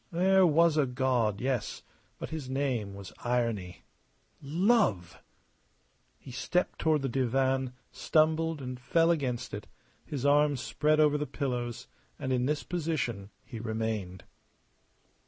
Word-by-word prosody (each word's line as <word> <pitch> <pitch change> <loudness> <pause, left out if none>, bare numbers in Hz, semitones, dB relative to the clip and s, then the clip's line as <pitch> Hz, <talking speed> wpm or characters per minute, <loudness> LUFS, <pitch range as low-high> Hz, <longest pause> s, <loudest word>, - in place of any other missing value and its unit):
There 185 +2 +4
was 165 0 +4
a 145 -3 +3
God, 125 -5 0
yes, 125 -4 -2 0.3
but - - -7
his 155 -5 -5
name 130 -7 -1
was 100 -1 -10
Irony. 115 -7 -1 0.6
Love! 160 - +1 1.0
He 130 - -12
stepped 135 +8 -1
toward 155 -3 +2
the - - +1
divan, 130 +1 0 0.2
stumbled, 160 -1 +1
and 125 -1 -5
fell 165 +6 +3
against 125 -6 -2
it, 105 - -6 0.4
his 140 -2 -4
arms 145 -1 +4
spread 155 +4 +1
over 150 -1 +4
the 150 - -2
pillows; 125 -4 -3 0.3
and 130 - -2
in 125 0 +1
this 150 0 -1
position 150 - -2 0.2
he 115 - -8
remained. 110 -5 -3
135 Hz, 130 wpm, -30 LUFS, 120-155 Hz, 1.0 s, There